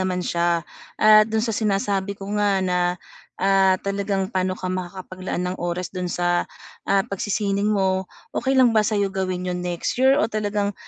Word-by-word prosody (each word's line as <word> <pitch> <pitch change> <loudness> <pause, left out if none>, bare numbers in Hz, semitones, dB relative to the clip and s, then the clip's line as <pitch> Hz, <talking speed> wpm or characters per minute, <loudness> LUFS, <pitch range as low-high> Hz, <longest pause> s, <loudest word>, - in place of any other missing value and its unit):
naman 185 -1 -1
siya. 170 0 +1 0.6
Ah, 215 0 +9
do'n 220 0 0
sa 225 - -1
sinasabi 200 -1 0
ko 195 - -7
nga 205 0 +2 0.2
na, 180 - +1 0.6
ah, 195 -1 +4
talagang 200 -1 -1
paano 185 0 +1
ka 185 - -3
makakapaglaan 185 0 -4
ng - - -9
oras 180 +1 -3
do'n 180 -1 -3
sa, 175 - +1 0.6
ah, 195 0 +4
pagsisining 200 +1 -1
mo 190 -2 +1 0.3
okey 265 +2 +1
lang 245 -3 +5
ba 215 - +5
sa'yo 205 -2 +1
gawin 185 -1 -3
'yon 180 0 -3
next 175 -1 -2
year 265 +2 +5
o - - +3
talagang, 205 -2 -1
195 Hz, 170 wpm, -23 LUFS, 185-205 Hz, 0.6 s, Ah